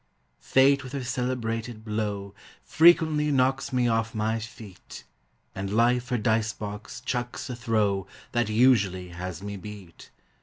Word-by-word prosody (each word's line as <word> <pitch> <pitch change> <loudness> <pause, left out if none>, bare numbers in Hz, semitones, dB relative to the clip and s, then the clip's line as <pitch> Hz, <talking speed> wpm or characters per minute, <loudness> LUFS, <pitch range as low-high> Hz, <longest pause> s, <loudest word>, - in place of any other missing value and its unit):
Fate 140 +1 +4
with 130 - -9
her 140 -2 -3
celebrated 120 -3 -3
blow 105 -2 -3 0.3
Frequently 160 -2 +4
knocks 135 0 +1
me 125 -2 +2
off 115 -1 0
my 110 +1 0
feet; 110 -4 -11 0.5
And 95 0 -4
Life 120 +3 +2
her 125 - +1
dice 110 0 +1
box 105 0 -7
chucks 120 +1 -3
a - - -4
throw 105 -5 0 0.2
That 120 -2 0
usually 105 -6 +3
has 90 +1 -6
me 100 0 -5
beat. 100 -3 -11
115 Hz, 140 wpm, -26 LUFS, 105-125 Hz, 0.5 s, Fate